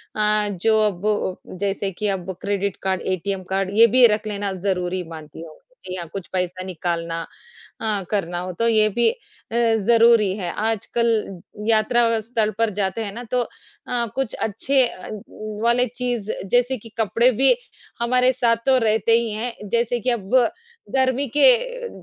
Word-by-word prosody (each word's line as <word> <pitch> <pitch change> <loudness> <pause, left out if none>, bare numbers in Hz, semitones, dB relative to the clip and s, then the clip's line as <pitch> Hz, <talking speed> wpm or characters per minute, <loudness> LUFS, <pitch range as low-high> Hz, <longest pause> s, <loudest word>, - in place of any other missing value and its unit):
अ, 210 0 +2
जो 220 +4 +2
अब 205 -1 -1 0.2
जैसे 200 0 -1
कि 210 +3 -3
अब 185 +1 -6
क्रेडिट 200 -1 -1
कार्ड, 190 -1 0
एटीएम 190 +1 -2
कार्ड 195 0 0
ये 230 - +9
भी 255 -1 +8
रख 215 - -8
लेना 205 -1 -2 0.2
ज़रूरी 180 -1 -1
मानती 155 0 -10
हूँ। 160 -2 -11 0.3
जी 185 - -5
हाँ, 175 -2 -6
कुछ 195 -3 -6
पैसा 185 0 -2
निकालना 170 -2 -3 0.6
अ, 210 -3 -1
करना 180 -4 -1
हो, 180 +1 -4
तो 230 +6 0
ये 215 -2 +4
भी 235 +3 +2
अ, 460 - -3 0.4
ज़रूरी 230 -2 +4
है। 180 -4 -3
आजकल 220 -2 -1 0.3
यात्रा 230 +1 +3
स्थल 220 -1 -1
पर 230 0 +2
जाते 200 +3 -1
हैं 205 - -5
ना, 240 +3 -7
तो 250 -1 +2 0.5
अ, 240 -1 0
कुछ 265 -3 -2
अच्छे 255 +5 +1
अ, 185 - -10 0.5
वाले 240 +1 +3
चीज़ 240 -3 -3 0.2
जैसे 245 +2 +2
कि 225 0 -13
कपड़े 230 +3 +3
भी 255 +2 +4 0.4
हमारे 250 +2 +3
साथ 240 -2 +2
तो 265 -1 +5
रहते 220 0 +2
ही 235 -1 -1
हैं। 220 -1 -5
जैसे 235 +2 +1
कि 250 - -1
अब 215 -6 -2 0.7
गर्मी 265 +1 +1
के - - +8
अ, - - -5
215 Hz, 165 wpm, -22 LUFS, 190-235 Hz, 0.7 s, ये